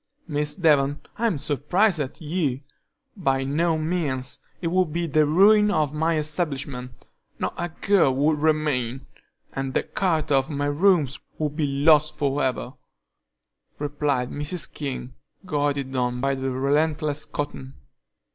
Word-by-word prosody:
"Miss 150 -1 -1
Devon, 145 -5 +3 0.2
I'm 225 -8 +1
surprised 160 +7 +1
at 140 -2 -4
you! 150 -5 -1 0.5
By 135 -9 0
no 160 +4 +1
means; 155 -6 -2 0.2
it 170 - -2
would 180 -2 +1
be 170 +2 -1
the 155 -1 +3
ruin 210 +6 +5
of 155 -7 +1
my 160 +1 +1
establishment; 145 -5 -3 0.3
not - - -2
a 175 +1 -3
girl 175 -3 +2
would 150 +2 +2
remain, 145 -5 0 0.5
and 135 -1 -3
the - - +2
character 160 -6 0
of 135 +2 +2
my 145 -1 -2
rooms 145 -2 +2 0.2
would 150 -1 -2
be 150 -2 0 0.2
lost 150 -1 +5
for 145 0 0
ever," 130 -1 -2 1.0
replied 145 -3 -1
Mrs. 150 +4 -2
King, 130 -3 -5 0.3
goaded 145 -5 -1
on 125 -1 0
by 135 +2 +1
the 135 0 -2
relentless 150 +3 0
Cotton. 140 -2 -5
150 Hz, 135 wpm, -24 LUFS, 135-160 Hz, 1.0 s, ruin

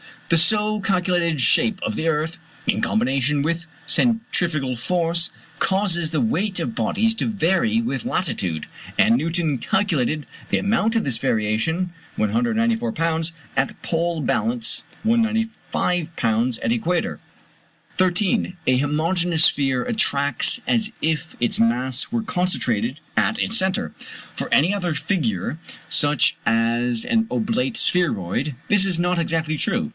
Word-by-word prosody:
The 165 - +4
so 210 +5 +4
calculated 180 -6 +1
shape 115 -1 +3
of 105 - -2
the 160 - -2
earth, 160 +1 0 0.3
in - - +1
combination 145 - +1
with 165 +2 -2 0.2
centrifugal 175 - 0
force, 170 +5 0 0.3
causes 185 -4 +1
the 155 - 0
weight 215 -4 0
of 230 - -3
bodies 225 +1 +1
to - - -2
vary 205 +3 +1
with 235 0 -3
latitude; 90 - -1 0.3
and 220 +2 +5
Newton 165 - 0
calculated 155 - 0 0.2
the - - +2
amount 220 +2 +1
of 225 - +2
this 125 -5 0
variation. 115 +13 0 0.2
194 230 - +1
lbs. 165 -3 -1 0.2
at - - 0
pole 170 -1 -1
balance 230 - -1 0.2
195 220 -7 0
lbs. 115 +1 +1
at 115 - +1
equator. 170 +10 -1 0.8
13. 185 0 +1
A 130 0 +4
homogeneous 160 +4 +1
sphere 135 -5 +3
attracts 145 - 0
as 225 -2 +1
if 160 0 -1
its 120 - +2
mass 125 +3 +2
were 230 -1 -1
concentrated 135 - -1 0.2
at 225 - +2
its 220 +2 +2
centre. 185 - 0 0.4
For - - -4
any 165 +8 +4
other 180 -5 -1
figure, 140 - -1 0.3
such 145 -2 +2
as 115 +1 +1
an 225 -1 +1
oblate 235 +2 -1
spheroid, 140 - 0
this 205 -1 +4
is 185 -3 +2
not 175 0 +1
exactly 160 -2 0
true. - - -1
170 Hz, 130 wpm, -22 LUFS, 140-210 Hz, 0.8 s, and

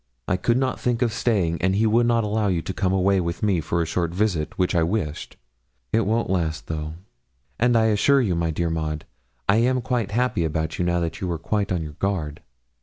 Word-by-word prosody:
I - - +2
could 115 +6 +1
not 130 0 0
think 120 0 0
of 115 -3 0
staying, 95 -9 0
and 95 +1 +2
he 110 +3 +2
would 115 +2 +3
not 115 -1 +2
allow 105 0 0
you 85 -4 0
to 95 - -4
come 95 0 0
away 95 0 +3
with 85 +2 -4
me 95 -5 +2
for 85 +2 0
a - - -3
short 85 +1 -1
visit, 95 -6 -1
which 90 0 +1
I 85 - +3
wished. 80 -3 -2 0.6
It 110 -2 +2
won't 115 +2 +1
last, 85 -4 -1
though; 80 0 -4 0.6
and 120 0 +4
I 110 0 +3
do - - +3
assure 140 +7 +4
you, 110 -8 +1
my 85 -1 0
dear 85 +1 -1
Maud, 80 -1 -3 0.4
I 100 - +4
am 125 +3 +2
quite 120 -4 -1
happy 115 -4 0
about 80 0 -2
you 90 - +1
now 85 0 +1
that 85 -1 -3
you 90 -2 -2
are 85 - -1
quite 100 +4 -1
on 90 -3 0
your 75 -1 -9
guard. 85 -7 -2
95 Hz, 235 wpm, -24 LUFS, 85-110 Hz, 0.6 s, and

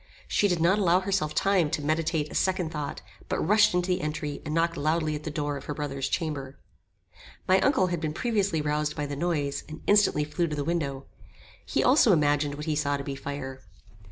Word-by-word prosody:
She 205 - +2
did 175 -3 0
not 180 +5 +3
allow 180 -1 +3
herself 185 -6 -1
time 190 -5 +2
to 150 - -2
meditate 155 0 0
a - - -8
second 185 -4 0
thought, 150 -3 -5 0.3
but - - 0
rushed 210 +2 +4
into 180 +1 0
the 180 - +1
entry 150 -1 -4
and 150 - -5
knocked 165 0 +1
loudly 155 +1 0
at 150 0 -6
the - - -2
door 145 -1 -2
of 135 - -10
her 150 - -4
brother's 140 -2 -3
chamber. 140 -5 -3 0.9
My 185 +1 +5
uncle 260 -5 +3
had 170 - -2
been 155 -1 -1
previously 200 -4 0
roused 150 0 -1
by 150 - -2
the 145 0 -4
noise, 145 -3 -1
and 155 - -9
instantly 205 -7 +4
flew 160 +3 -1
to 150 - -3
the 145 - -2
window. 140 -5 -2 0.6
He - - +1
also 250 -5 +5
imagined 145 -2 +2
what 150 +1 -6
he 155 -2 0
saw 145 -1 0
to 140 - -6
be 140 - -4
fire. 135 -1 -6
155 Hz, 215 wpm, -27 LUFS, 145-175 Hz, 0.9 s, My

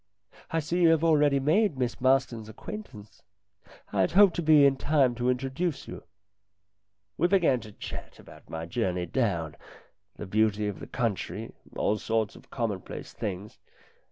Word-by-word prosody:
I 165 - 0
see 170 +4 -1
you 170 - +6
have 165 -1 +3
already 150 -4 +4
made 160 +4 +2
Miss 125 -2 -2
Marston's 130 -4 +1
acquaintance. 110 - -9 0.7
I 100 - +2
had 95 - +1
hoped 195 -2 +6
to - - 0
be 155 -3 +6
in 135 -1 +4
time 135 -2 +2
to 120 +1 -1
introduce 135 +5 -2
you." - - -8 1.2
We 170 - +4
began 175 -9 +3
to 110 -2 -11
chat - - -8
about - - -16
my 80 0 -5
journey 90 -1 -1
down, 85 - -1 0.6
the - - -7
beauty 105 +1 +1
of 105 - -4
the - - -8
country, 115 -6 -3 0.2
all 105 +1 0
sorts 110 -1 -1
of - - -16
commonplace 110 -7 -4
things. 100 +1 -6
125 Hz, 155 wpm, -28 LUFS, 105-155 Hz, 1.2 s, you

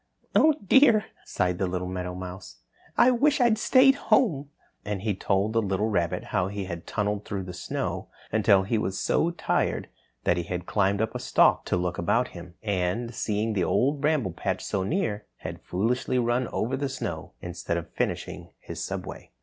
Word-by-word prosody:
"Oh, 310 -1 +5
dear," 225 -1 +6 0.2
sighed 90 0 -1
the 95 - +1
little 90 0 -3
meadowmouse, 90 +1 -6 0.4
"I 255 - +6
wish 280 +4 +3
I'd 235 -3 +4
stayed 265 +4 +6 0.2
home," 150 - +3 0.3
and 100 -2 -4
he 110 -2 +1
told 100 +3 0
the 115 - +3
little 100 +1 0
rabbit 85 -5 0
how 90 - +2
he 100 0 -4
had 85 -2 -7
tunneled 105 -1 -1
through 100 -2 -4
the 90 0 -7
snow 85 - -3 0.2
until 105 -3 +4
he 110 +3 0
was 95 -3 -2
so 165 - +2
tired 170 - -1 0.3
that 85 - +2
he 85 - -1
had 90 0 -4
climbed 100 +1 +1
up 110 - -3
a - - -4
stalk - - +3
to - - 0
look 90 -1 -2
about 110 +8 +1
him, 85 0 -11
and, 100 +4 -1
seeing 110 0 -1
the 95 -4 +1
Old 140 - +1
Bramble 150 - +1
Patch 95 +2 -2
so 100 - -1
near, 105 - -1
had - - -7
foolishly 120 +7 0
run 120 +1 +1
over 125 +4 -1
the 140 +1 -2
snow 115 -12 -5
instead 90 -1 -3
of 85 0 -7
finishing - - -3
his - - -6
subway. - - -6
105 Hz, 180 wpm, -27 LUFS, 90-125 Hz, 0.4 s, dear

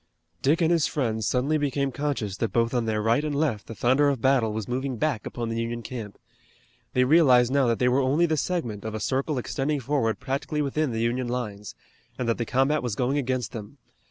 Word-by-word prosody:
Dick 150 +6 +2
and 165 0 +3
his 165 -3 +3
friends 110 -6 -1
suddenly 140 +5 +1
became 140 -1 0
conscious 135 -9 -2
that 115 - -1
both 115 +1 +1
on 120 -2 +1
their 110 -1 -1
right 115 +6 +2
and 150 -2 -2
left 140 -8 -1
the 115 - -7
thunder 130 +6 +3
of 140 -3 -1
battle 130 -3 +2
was 110 -1 -4
moving 130 +1 -2
back 140 -5 -1
upon 120 -1 -4
the 115 0 -2
Union 115 0 -4
camp. 110 -4 -7 0.8
They 125 - +4
realized 130 -4 +5
now 140 -3 +3
that 115 -1 +1
they 125 - +2
were 130 +2 +3
only 140 +6 +3
the 160 -2 +1
segment 130 - -2
of 110 0 -4
a - - -3
circle 135 +6 -1
extending 140 +4 -1
forward 130 -4 0
practically 145 +3 -2
within 145 0 -1
the 115 0 -2
Union 120 +2 0
lines, 105 -5 -4 0.4
and 125 - -2
that 115 - 0
the 120 - 0
combat 135 +4 +2
was 120 -4 -3
going 130 +4 0
against 130 -4 -2
them. 110 +4 -8
125 Hz, 220 wpm, -26 LUFS, 115-140 Hz, 0.8 s, realized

